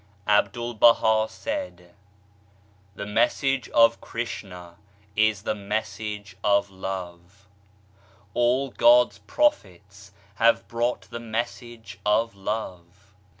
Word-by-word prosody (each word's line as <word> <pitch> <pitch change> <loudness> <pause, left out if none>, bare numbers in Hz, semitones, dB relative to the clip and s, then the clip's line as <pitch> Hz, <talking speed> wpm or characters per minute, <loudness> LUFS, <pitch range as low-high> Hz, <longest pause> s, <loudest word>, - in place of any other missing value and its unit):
Abdul 105 +3 +1
Baha 110 -1 +4
said: 280 - -6 1.0
The 100 - -6
Message 125 +5 0
of 115 0 +4
Krishna 90 -7 -7 0.4
is 110 -2 +2
the - - -1
message 105 0 -5
of 100 -1 +2
Love. 95 0 -8 0.9
All 125 +3 +1
God's 120 -5 +4
prophets 100 - -2 0.3
have 115 +1 +3
brought 120 +1 -1
the 120 - -9
message 115 -3 -6
of 110 +2 +1
Love. 95 -2 -6
105 Hz, 95 wpm, -25 LUFS, 100-120 Hz, 1.0 s, Baha